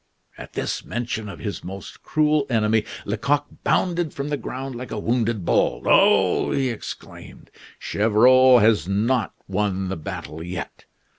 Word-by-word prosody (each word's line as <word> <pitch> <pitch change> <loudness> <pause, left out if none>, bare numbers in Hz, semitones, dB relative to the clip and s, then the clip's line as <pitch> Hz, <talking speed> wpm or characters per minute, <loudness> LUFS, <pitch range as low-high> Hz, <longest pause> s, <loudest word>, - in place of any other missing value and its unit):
At - - -11
this - - -3
mention 115 -3 -4
of 95 - -8
his 100 +5 -5
most 95 +2 -9
cruel 150 -2 +1
enemy, 110 -2 +2 0.2
Lecoq 130 +8 0 0.2
bounded 175 -4 0
from 140 +1 -4
the 150 - 0
ground 135 -1 -6
like 125 +1 -7
a - - -5
wounded 115 -3 -1
bull. - - +1
"Oh!" - - +4
he 135 -2 0
exclaimed. 115 - -9 0.3
"Gevrol 125 +5 +5
has 105 -6 +3
not 110 +5 0
won 95 -2 -1
the 95 - -3
battle 80 0 -7
yet. 90 +2 -7
115 Hz, 145 wpm, -23 LUFS, 100-130 Hz, 0.3 s, Gevrol